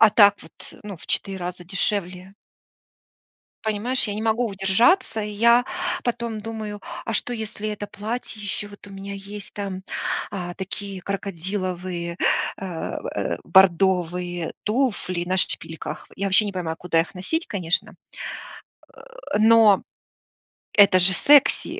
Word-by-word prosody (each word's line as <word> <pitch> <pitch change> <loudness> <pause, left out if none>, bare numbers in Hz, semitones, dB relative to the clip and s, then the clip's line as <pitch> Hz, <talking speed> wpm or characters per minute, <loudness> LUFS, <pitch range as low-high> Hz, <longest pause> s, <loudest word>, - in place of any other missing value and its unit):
А 220 - +9
так 205 -2 +7
вот, - - -15 0.3
ну, 200 -3 -6
в - - -14
4 195 -1 -1
раза 180 0 -5
дешевле. 185 0 -2 1.3
Понимаешь, 220 +4 0
я 205 - -2
не 215 - -3
могу 225 +2 +1
удержаться, 215 - +2
и 210 0 -4
я 235 +4 +4 0.4
потом 235 -2 -2
думаю: 215 -2 -5 0.3
"А 225 - -2
что, 245 +3 -1
если 215 -1 -5
это 205 -1 -5
платье 215 +1 -5
ещё, 205 +1 -3
вот 205 0 -13
у - - -12
меня 195 +1 -7
есть 200 +1 -8
там, 195 -2 -4 0.5
а, 175 -3 -4
такие 195 0 -5
крокодиловые, 185 -2 -3 0.4
а, 180 -4 -5
в, - - -5
э, - - -2
бордовые 180 -2 +3
туфли 210 -7 0
на 185 +1 0
шпильках". 160 -2 -2
Я 195 +1 -1
вообще 195 +3 +5
не 205 - -2
понимаю, 165 -3 -3
куда 165 -2 +2
их 170 - -7
носить, 320 - -1
конечно. 175 -5 0 1.4
Э, - - +3
но 220 -2 +6 0.9
это 200 -3 +7
же 185 +1 +5
секси. 285 +8 +4
200 Hz, 140 wpm, -23 LUFS, 185-215 Hz, 1.4 s, А